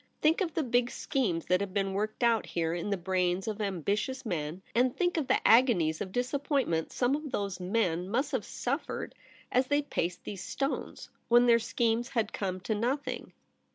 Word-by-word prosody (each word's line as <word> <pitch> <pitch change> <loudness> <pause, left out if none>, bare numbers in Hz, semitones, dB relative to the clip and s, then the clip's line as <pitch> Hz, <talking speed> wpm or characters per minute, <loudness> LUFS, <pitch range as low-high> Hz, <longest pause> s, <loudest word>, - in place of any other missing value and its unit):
Think 315 +5 +3
of 340 -4 -1
the 320 - +1
big 245 -1 +2
schemes 200 -15 -1
that 180 +1 +2
have 200 -1 -4
been 195 -1 0
worked 215 +4 -2
out 230 -5 +3
here 165 0 -1
in 175 +4 -3
the 200 - 0
brains 180 +1 0
of 215 0 -3
ambitious 205 - -1
men; 165 -1 -3
and 250 +1 +2
think 355 -1 +1
of 310 -6 0
the - - +2
agonies 215 -10 +4
of 190 - -4
disappoint 275 +4 0
ment 160 -1 -1
some 255 +2 +1
of 300 0 -5
those 200 -2 -2
men 180 -2 0
must 265 +7 0
have 255 -7 -1
suffered 275 +9 -3 0.4
as 255 +1 +3
they 290 +1 +2
paced 175 - -2
these 195 -3 -6
stones, 275 +1 -3 0.2
when 240 +1 +6
their 235 -1 +6
schemes 235 +1 0
had 230 -4 -1
come 185 -2 -2
to 220 - -1
nothing.' 250 +7 -2
225 Hz, 190 wpm, -30 LUFS, 185-255 Hz, 0.4 s, when